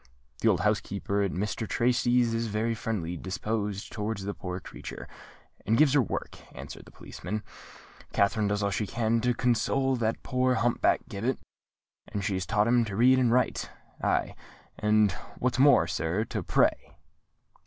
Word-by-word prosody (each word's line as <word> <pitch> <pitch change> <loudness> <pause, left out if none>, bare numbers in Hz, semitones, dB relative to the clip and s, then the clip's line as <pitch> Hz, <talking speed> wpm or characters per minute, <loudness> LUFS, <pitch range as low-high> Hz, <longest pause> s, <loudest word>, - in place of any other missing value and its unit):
"The - - +1
old - - +3
housekeeper 100 +1 0
at 100 - +1
Mr. 105 +3 -3
Tracy's 120 -1 +2
is 115 0 -1
very 110 +2 -1
friendly 105 -7 -3
disposed 100 +2 -3
towards 105 -1 -3
the 100 +1 -3
poor 90 -2 -5
creature, - - -9 0.6
and 110 +3 +2
gives 150 -2 +5
her 145 - +5
work," 115 - -4 0.2
answered - - -9
the - - -15
policeman. 105 0 -6 0.7
"Katherine 105 +1 +2
does 105 0 0
all 100 - +1
she 105 +1 -1
can 115 0 0
to 125 0 +1
console 130 +3 +1
that 115 -1 -1
poor 130 0 +1
hump 120 0 0
back - - +3
Gibbet; 115 +6 -2 0.7
and 100 - -4
she 100 - 0
has 95 -1 -2
taught 105 0 +2
him 120 0 +4
to 100 -3 -5
read 130 +4 +5
and 125 -2 +3
write—aye, 125 +1 -1 0.5
and 105 -1 +3 0.3
what's 125 0 0
more, 135 -10 +6
sir, 85 +4 -1
to - - -4
pray." - - +1
110 Hz, 165 wpm, -28 LUFS, 100-120 Hz, 0.7 s, more